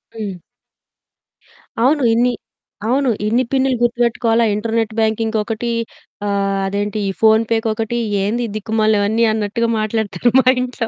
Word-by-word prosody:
హ్మ్. 200 -5 -6 1.4
అవును 275 +4 +3
ఇన్ని 240 +2 +2 0.6
అవును 265 +2 +2 0.2
ఇన్ని 235 +4 +2
పిన్నులు 265 -1 +2
గుర్తుపెట్టుకోవాలా 235 -1 +2
ఇంటర్నెట్ 225 +1 -1
బ్యాంకింగ్‌కి 220 0 0
ఒకటి 225 +2 -4 0.6
ఆహ్, 195 -1 0
అదేంటి 205 +2 -2
ఈ - - 0
ఫోన్ 220 0 +5
పేకి 225 0 0
ఒకటి 225 +1 -3 0.3
"ఏంది 235 +4 -1
దిక్కుమాలి 215 0 +1
అవన్నీ" 220 +3 +1
అన్నట్టుగా 220 +2 -1
మాట్లాడుతారు. 215 -1 0
మా 260 - +2 0.2
ఇంట్లో, 250 -2 -3
225 Hz, 125 wpm, -18 LUFS, 215-240 Hz, 1.4 s, ఫోన్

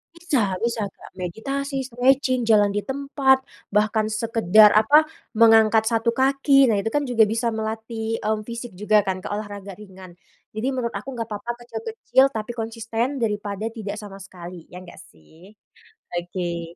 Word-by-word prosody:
Bisa 265 - 0
bisa 235 -2 -1
Kak, - - -16
meditasi, 275 +10 -4
stretching, 255 +1 +2
jalan 205 -2 +4
di 205 - -1
tempat, 265 0 +1 0.2
bahkan 215 +1 +1
sekedar, 215 -2 +4
apa, 290 +9 +5 0.3
mengangkat 225 -1 +5
satu 230 0 +1
kaki, 275 +2 +3
nah 220 -5 +2
itu 225 - -2
kan 290 +4 -1
juga 235 -3 +3
bisa 230 +1 -1
melatih, 220 +1 -4
mmm, 215 0 -2
fisik 235 0 -8
juga 210 +2 +2
kan, 185 -1 -2
ke - - -7
olahraga 205 -2 -6
ringan. 190 -3 -13 0.3
Jadi 215 +2 -5
menurut 240 -2 -3
aku, 265 +6 -8
nggak 230 -2 -5
apa-apa, 210 +3 -4
kecil-kecil, 270 - +1
tapi 220 +1 -4
konsisten 230 +3 -3
daripada 210 -1 -2
tidak 215 -3 -6
sama 200 -2 -10
sekali, 175 -2 -11
ya 180 - -8
nggak 175 - -13 0.2
sih? 160 - -19 0.6
Oke. 175 -1 -4
220 Hz, 155 wpm, -23 LUFS, 205-245 Hz, 0.6 s, apa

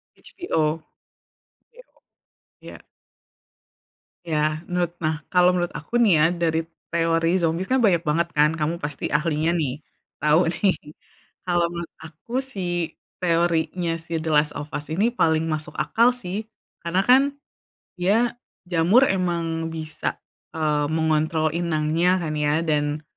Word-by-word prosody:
HBO? 160 - -2
bo 160 - -23 1.8
ya. - - -11 1.5
Ya, 155 -1 0
menurut 175 -1 -1
nah, 155 -1 -1
kalau 180 0 +4
menurut 175 -1 -1
aku - - -13
nih 215 -6 +5
ya, - - +6
dari 165 -2 0 0.3
teori 165 +1 +2
zombie 170 +1 0
kan 260 +1 +3
banyak 180 -6 +4
banget 165 +1 +1
kan, 150 0 +4
kamu 160 +2 -1
pasti 145 -1 -4
ahlinya 155 +1 +1
nih, 155 -7 0 0.5
tau 155 +3 +4
nih. 185 +3 +1 0.7
Kalau 175 -1 +2
menurut 170 -1 -6
aku 160 +8 -12
si 175 -10 -3 0.3
teorinya 170 0 +1
si 165 0 -4
The 160 - -3
Last 150 0 +3
of 145 - -6
Us 150 +1 -5
ini 205 +8 +2
paling 160 -8 +2
masuk 155 -1 -3
akal 235 +2 +3
sih, 205 -2 -5 0.4
karena 170 +3 +1
kan 255 +2 +7 0.8
dia 220 +7 +2 0.3
jamur 175 +8 +4
emang 170 -3 -1
bisa, 155 -1 -4 0.4
eee, 150 -2 +1
mengontrol 160 0 +1
inangnya 170 +2 +1
kan 155 -2 -3
ya, 150 +1 +2
dan 150 -1 0
165 Hz, 130 wpm, -23 LUFS, 155-180 Hz, 1.8 s, kan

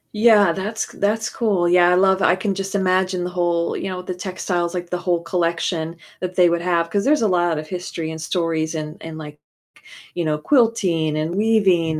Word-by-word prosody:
Yeah, 210 -4 +5
that's 210 +4 -3
c - - -16
that's 215 +2 0
cool, 200 -7 0
yeah, 175 0 +5
I 180 - +4
love 190 +1 +3
I 180 - +4
can 195 +1 -2
just 195 +1 -4
imagine 185 -1 +1
the 180 - -4
whole, 175 -1 0
you 195 - -4
know, 180 -1 -5
the 185 - -4
textiles, 180 -1 -3
like, 175 -1 -5
the 180 - 0
whole 175 -2 -1
collection 170 -1 -1 0.2
that 185 0 -5
they 180 -1 +5
would 170 0 0
have, 170 -2 +1
'cause 200 +2 -1
there's 295 -4 +2
a - - +3
lot 175 -3 +1
of 155 0 -6
history 170 -3 -5
and 160 0 -7
stories 165 -1 -1
and 155 0 -5
and, 160 -1 -8
like, 150 -1 -10 0.8
you 175 - -1
know, 150 -1 0
quilting 180 - +1
and 155 +3 -2
weaving, 190 -7 +2
180 Hz, 210 wpm, -21 LUFS, 165-190 Hz, 0.8 s, Yeah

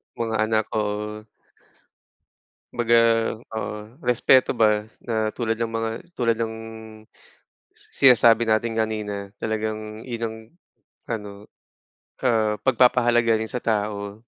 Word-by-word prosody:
Mga 115 -1 -2
anak, 110 -1 +1
oo. 105 0 -3 1.5
Kumbaga 120 -1 +2 0.6
oo 110 -1 -3 0.3
respeto 125 +1 +4
ba 105 -1 +3 0.2
na 115 - -3 0.2
tulad 115 -2 -1
ng 115 -1 -2
mga, 115 0 -1 0.3
tulad 115 -2 +2
ng 110 -1 -2 1.2
sinasabi 120 -3 +4
natin 110 +1 0
kanina 105 -2 -3
talagang 110 0 -4
yun 120 -2 -5
ang, 110 0 -8 0.7
ano, 105 -3 -3 1.0
oo 110 -3 +2 0.2
pag-papahalaga 120 -2 +4
rin 110 0 -4
sa 125 - -4
tao. 105 -2 -2
110 Hz, 105 wpm, -23 LUFS, 105-115 Hz, 1.5 s, respeto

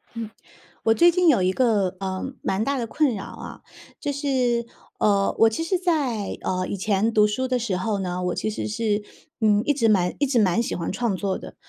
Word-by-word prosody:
嗯， 230 -2 -5 0.5
我 225 - +4
最 345 +8 +5
近 360 0 +2
有 255 - +5
一 185 - +2
个， 200 -5 +1
呃， 190 -1 -3 0.2
蛮 195 +2 -1
大 275 +3 -1
的 235 -2 -2
困 290 +2 +1
扰 195 - -5
啊， - - -9 0.4
就 290 - -2
是， 255 -4 0 0.3
呃， 200 -2 +2
我 225 - +7
其 225 +9 -3
实 370 +2 +1
在， 290 - -1
呃， 185 0 -1
以 200 - -3
前 205 +3 +1
读 210 -1 +4
书 210 +5 -2
的 255 -1 0
时 225 -5 -2
候 205 +2 -1
呢， 180 -1 -3
我 180 -1 -1
其 - - -2
实 215 - -4
是， 215 -1 -1 0.4
嗯， 210 -1 +4
一 290 - +3
直 235 -5 +2
蛮 180 -4 +2
一 285 - +3
直 260 -3 +2
蛮 210 +3 +2
喜 - - -3
欢 170 - -3
创 235 -5 -1
作 195 0 -1
的。 - - -11
220 Hz, 235 characters per minute, -24 LUFS, 195-255 Hz, 0.5 s, 我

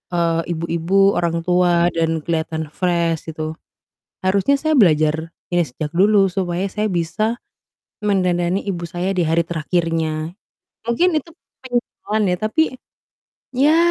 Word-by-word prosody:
eee, 165 -1 +2
ibu-ibu, 170 +4 +2
orang 170 -1 -1
tua, 175 -1 +3
dan 165 -1 -1
kelihatan 160 -2 -2
fresh 170 -3 0
gitu. 155 0 -5 0.6
Harusnya 200 +9 +2
saya 310 -1 +1
belajar 160 - +3 0.2
ini 175 -1 +2
sejak 150 +2 -5
dulu 200 0 +5
supaya 185 0 -2
saya 210 +1 -2
bisa 215 +8 -1 0.6
mendandani 185 -2 +1
ibu 175 -4 -3
saya 180 +3 -2
di 185 - -1
hari 165 +1 +2
terakhirnya. 165 -1 -1 0.5
Mungkin 310 +9 +2
itu 335 +2 -3 0.3
penyesalan 240 -3 -2
ya, 180 - +1
tapi, 215 - +1 0.9
ya, 285 +5 +4
175 Hz, 125 wpm, -20 LUFS, 165-200 Hz, 0.9 s, dulu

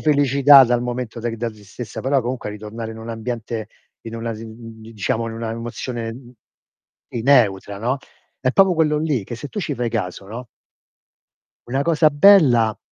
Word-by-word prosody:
felicità 140 -2 +6
dal 120 0 +1
momento 120 -1 -4
de 120 - -2
c - - -5
da 120 +1 -2
tristezza, 105 +1 -9
però 135 +1 +1
comunque 120 -1 -4
a - - -7
ritornare 110 +2 -7
in 110 - -9
un 110 +1 -9
ambiente 115 -1 -5 0.3
in 115 0 -8
una 115 0 -4
z 110 - -10
mhmm 115 0 -11
di 115 +1 -12
diciamo 110 +2 -1
in 115 - -7
una 115 0 -4
emozione, 115 0 -5
mhmm 120 +1 -12 0.8
si, 115 - -3
neutra, 105 -7 +3
no, 125 +5 -1 0.4
è 130 - +1
proprio 195 0 +5
quello 150 -2 +2
lì 150 -7 0
che 120 - -6
se 145 +5 -7
tu 205 - -5
ci 150 -5 -3
fai 120 -1 -2
caso, 100 -4 -4
no 120 +5 -8 1.2
una 135 +3 -1
cosa 160 -1 +4
bella 145 - +5
120 Hz, 190 wpm, -21 LUFS, 110-135 Hz, 1.2 s, felicità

